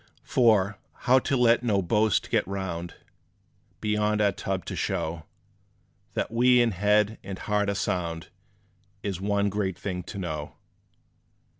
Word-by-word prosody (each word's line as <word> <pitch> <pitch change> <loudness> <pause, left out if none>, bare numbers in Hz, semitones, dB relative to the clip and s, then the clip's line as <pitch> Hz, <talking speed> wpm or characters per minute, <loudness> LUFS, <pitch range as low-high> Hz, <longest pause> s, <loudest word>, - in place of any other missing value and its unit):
For, 105 -5 +3 0.2
how 130 0 +5
to 135 0 0
let 120 -1 +4
no 105 -5 +1
boast 105 +3 +1
get - - +2
round 90 -3 -4 0.9
Beyond 105 0 +1
our 105 -1 +3
tub, 95 -2 -4
to - - -5
show 80 0 -2 0.9
That - - -1
we 125 +2 +5
in 120 -1 +3
head 105 +3 +2
and 95 -1 -6
heart 105 0 0
are 100 - -1
sound, 85 -4 -2 0.7
Is 95 -3 -3
one 100 0 +1
great 95 -3 -2
thing 90 -3 -4
to - - -8
know. 80 -6 -5
100 Hz, 140 wpm, -27 LUFS, 95-105 Hz, 0.9 s, how